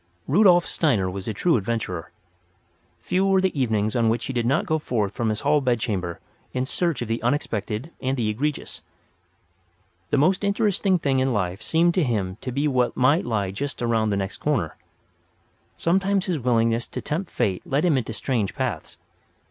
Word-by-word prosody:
Rudolf 175 +2 +5
Steiner 110 - +1
was 95 +2 -6
a - - 0
true 165 - +2
adventurer. 95 -5 -3 0.9
Few 185 +1 0
were 195 -1 +4
the 185 -7 0
evenings 110 -3 0
on 115 -2 +3
which 115 +1 0
he 135 - -4
did 120 -1 0
not 140 +5 +2
go 160 -2 0
forth 110 -8 -1
from 115 +1 -1
his 105 - -2
hall 150 - +3
bedchamber 110 -9 -1 0.3
in 130 0 -1
search 165 -1 -1
of - - -6
the 115 +1 -2
unexpected 120 +1 -2
and 135 +1 -1
the 115 -3 0
egregious. 140 +8 -3 1.3
The - - +2
most 185 +8 +3
interesting 200 -2 +2
thing 140 -5 +1
in 130 0 +1
life 95 -1 -1
seemed 170 +6 +2
to 180 - +2
him 100 -7 -1
to 130 - -4
be 140 +4 0
what 125 -3 +1
might 140 +5 +3
lie 100 -5 -1
just 140 +8 -4
around 115 -2 +1
the 100 - 0
next 95 0 -3
corner. 120 - -1 1.0
Sometimes 195 +2 +1
his 175 -5 -1
willingness 115 -1 +1
to - - -6
tempt 170 +5 -3
fate 95 -3 -1
led 145 +5 0
him 165 -5 +3
into 125 -3 -1
strange 110 -2 -2
paths. - - -3
125 Hz, 180 wpm, -24 LUFS, 110-155 Hz, 1.3 s, Rudolf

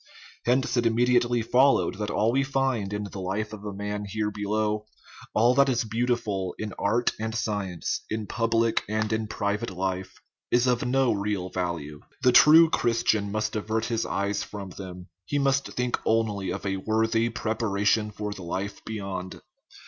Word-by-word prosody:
Hence 125 0 +2
it 120 -1 +3
immediately 120 0 +2
followed 125 -7 +3
that 105 -1 -2
all 110 +2 +2
we 135 +3 +2
find 135 -7 0
in 105 0 -2
the 100 -1 -7
life 100 +4 -3
of 105 - -8 0.2
man 105 0 -3
here 105 +1 -2
below, 105 +1 -1 0.5
all 120 +3 +5
that 140 +1 +4
is 120 -2 +1
beau 115 +3 -1
tiful 100 -7 -1
in 105 -3 -5
art 115 +4 +2
and 110 +1 -3
science, 100 -7 -2
in 110 0 -2
public 115 0 +1
and 110 0 0
in 110 0 -1
private 105 +2 -2
life, 95 0 -3 0.3
is 120 +1 +3
of 125 -1 +2
no 130 0 +3
real 100 -2 -2
value. 85 -5 -3 0.2
The 125 - +6
true 155 +6 +8
Christian 115 -3 +1
must 105 +1 -1
avert 110 +1 -1
his 115 -2 -1
eyes 100 +1 -1
from 95 0 -7
them; 90 -1 -8 0.2
he 145 - -2
must 135 -1 +2
think 125 0 -1
only 105 -4 0
of 90 - -4
a 95 -1 -1
worthy 110 +3 +1
preparation 110 -1 0
for 105 0 -5
the 95 - -10
life 95 +4 -4
beyond. 95 -4 -5
110 Hz, 170 wpm, -26 LUFS, 100-120 Hz, 0.5 s, true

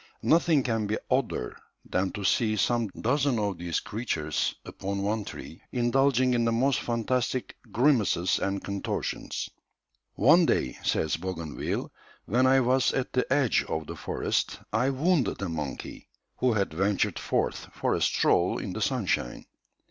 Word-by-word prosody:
Nothing 165 -4 +4
can 115 -3 -1
be 110 +1 0
odder 125 - 0 0.3
than 95 +1 0
to 105 - -5
see 110 +3 +2
some 115 +2 +1
dozen 135 +1 +1
of 100 -4 -1
these 85 -1 -1
creatures 80 -10 -2
upon 100 0 -4
one 105 +1 0
tree 80 - -9
indulging 130 +1 +2
in 120 -1 +2
the 115 - +2
most 130 +4 +2
fantastic 120 +2 -1 0.2
grimaces 115 -9 +2
and 100 0 -2
contortions. 100 -1 -3 0.6
"One 160 - +5
day," 65 - 0
says 80 - +1
Bougainville, 85 -4 -4 0.3
"when 125 +5 +3
I 135 0 +5
was 125 +1 +3
at 135 -1 -2
the 125 - 0
edge 140 -5 +3
of 80 0 -2
the - - -7
forest, - - -1 0.2
I 125 +4 +2
wounded 145 +1 +1
a 95 - -2
monkey 75 -4 -6 0.3
who 125 -2 +2
had 100 -6 0
ventured 95 +4 0
forth - - -1
for - - -1
a - - -1
stroll - - +2
in - - -4
the - - -4
sunshine. - - -1
115 Hz, 150 wpm, -27 LUFS, 95-130 Hz, 0.6 s, One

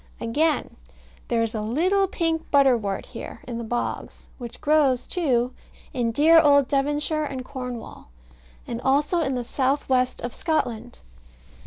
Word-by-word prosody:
Again. 295 +7 0 0.5
There 230 -1 +1
is 225 - -2
a 215 - -2
little 360 - +1
pink 330 -3 -2
butterwort 245 -8 +2
here - - -9
in 235 -2 -4
the - - -4
bogs, 240 +2 -4
which 240 -2 -8
grows, 290 -4 +2
too, 255 -8 0 0.4
in 240 -4 0
dear 315 +7 +6
old 285 -3 +5
Devonshire 295 +3 0
and 260 -3 -5
Cornwall; 250 - -7 0.6
and 235 0 -5
also 290 +6 +2
in 270 -4 -1
the 245 - -2
south 270 +3 -1
west 255 -1 +1
of 240 -1 -5
Scotland. 235 - -2
265 Hz, 145 wpm, -24 LUFS, 240-305 Hz, 0.6 s, dear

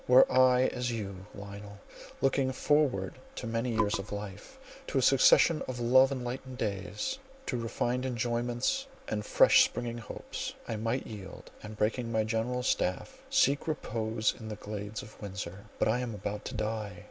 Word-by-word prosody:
Were 125 +1 +8
I 130 0 +5
as 125 -1 0
you, 100 -4 -5
Lionel, 100 0 -9 0.4
looking 135 -1 +2
forward 130 -7 +1 0.2
to - - -5
many 115 +2 -1
years 105 -3 +2
of 100 - -7
life, 105 - -7 0.3
to - - -1
a - - +4
succession - - +6
of 125 -1 -4
love 130 +3 +5
enlightened 130 0 -4
days, 105 - -3 0.3
to - - -2
refined 120 +2 -1
enjoyments 120 - -1 0.2
and 105 -1 -2
fresh - - +6
springing 120 -1 -3
hopes, 110 - -6
I 115 - -2
might 115 +4 -1
yield, 100 -4 -9
and 105 0 -9
breaking 115 +3 0
my 110 -1 +2
General's 120 +3 -1
staff, 90 -6 -1
seek 140 +3 +3
repose 110 -7 -1
in 110 - -8
the 105 - -4
glades 105 0 -6
of 105 - -14
Windsor. 100 -1 -6
But - - +2
I 115 +3 +2
am 120 -3 -3
about 105 +1 -5
to 130 - -5
die! 110 -2 -2
115 Hz, 165 wpm, -30 LUFS, 105-125 Hz, 0.4 s, Were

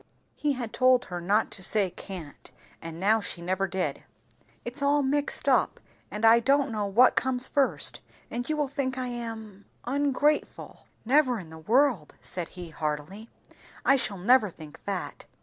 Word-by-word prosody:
(He 295 -1 -1
had 240 -4 -5
told 255 -1 +4
her 175 -1 -6
not 205 +5 +1
to 195 - -4
say 195 0 +3
can't, 170 -8 -9 0.3
and 165 0 -8
now 215 +4 +3
she 190 - -3
never 185 +3 -1
did.) 190 0 -3 0.6
"It's 245 +5 -3
all 285 +1 +3
mixed 285 +2 -1
up, - - +2 0.3
and 210 +2 -2
I 225 +1 +7
don't 275 +2 +2
know 210 -2 -2
what 235 +6 +5
comes 255 -1 +1
first; 280 -2 +1 0.3
and 245 +3 -4
you 310 - 0
will 295 -2 0
think 265 -2 -3
I 255 -1 -3
am 225 -4 -7 0.2
ungrateful." 285 +3 -1 0.2
"Never 255 0 +3
in 170 -6 -10
the 160 - -10
world!" 230 - +1
said 175 -3 -5
he 175 -2 -7
heartily. 160 +8 -5 0.6
"I 275 - +6
shall 210 -6 -1
never 215 +3 +4
think 155 -3 -13
that. 195 -3 -4
225 Hz, 165 wpm, -27 LUFS, 190-260 Hz, 0.6 s, I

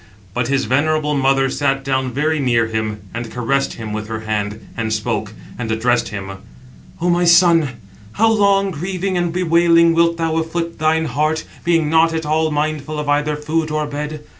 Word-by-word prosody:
But 125 +1 -1
his 135 0 0
venerable 150 +2 +1
mother 135 -1 +2
sat 135 0 -1
down 130 -1 -1
very 155 +4 0
near 120 -4 +2
him, 110 -1 -3
and 115 0 -5
caressed 125 +4 -1
him 110 -2 -6
with 105 0 -4
her 110 0 -5
hand, 105 -1 -3
and 115 -1 -2
spoke, 110 -1 -2 0.3
and 115 -2 -3
addressed 115 +1 +1
him: 95 -1 -6 0.6
"O 175 - -1
my 175 +1 +2
son, 170 -5 +5 0.4
how 225 +1 +3
long, 200 -2 +3
grieving 185 +4 -3
and 175 -1 0
bewailing, 170 -1 +4
wilt 170 0 +2
thou 165 -1 -1
afflict 165 +1 -3
thine 160 +1 +2
heart, 155 +3 -1 0.2
being 165 -2 +2
not 160 +1 +3
at 160 -1 -2
all 155 +1 +1
mindful 150 0 -2
of 150 -1 -4
either 150 +1 +1
food 155 +2 -2
or 155 0 -1
bed? 150 +1 -5
150 Hz, 180 wpm, -18 LUFS, 125-165 Hz, 0.6 s, son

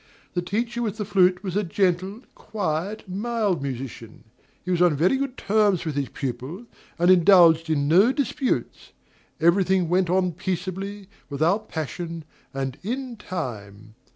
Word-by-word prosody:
The 175 - 0
teacher 230 +6 -2
with 215 -3 -2
the 210 - -3
flute 185 -2 +3
was 185 -2 -4
a 205 - +2
gentle, 190 +3 0
quiet, 195 +1 -4
mild 205 - -1
musician; 130 -4 -7 0.4
he 180 - -2
was 175 -1 +1
on 175 -4 +4
very 170 - +3
good 275 -1 -3
terms 205 -4 +2
with 155 - -2
his 140 -2 -2
pupil, 135 - -5 0.3
and 175 +2 +4
indulged 170 -3 +6
in 145 -2 +1
no 190 - +5
disputes; 270 -1 -2 0.5
every 170 +4 +4
thing 185 -2 +1
went 180 0 +2
on 180 0 +2
peaceably, 190 +3 -4 0.2
without 170 +10 0
passion, 165 +1 -5 0.3
and 135 -1 -4
"in 250 +4 -4
time." 110 - -7
180 Hz, 150 wpm, -24 LUFS, 160-205 Hz, 0.5 s, indulged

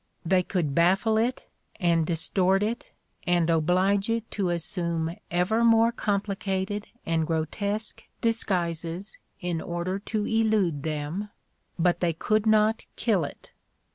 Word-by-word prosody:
They 185 +2 +3
could 170 -6 -1
baffle 190 +8 +3
it 245 +3 -1 0.3
and 170 -4 +2
distort 185 +3 +2
it 225 +3 -3 0.4
and 175 -1 +3
oblige 185 +6 +2
it 230 0 -2
to 195 -4 -1
assume 170 -1 -1
ever 185 +6 +1
more 230 0 +5
complicated 200 -2 -2 0.2
and 165 -1 0
grotesque 200 +7 -2
dis 230 -1 +1
guises 170 +1 -3 0.2
in 175 -3 -2
order 175 +3 -3
to 210 +1 -2
elude 215 -9 +1
them, 155 +7 -3 0.5
but 175 0 +2
they 170 -2 +1
could 215 +6 0
not 215 +1 +3
kill 210 -8 +1
it. 145 - -9
185 Hz, 130 wpm, -26 LUFS, 170-215 Hz, 0.5 s, more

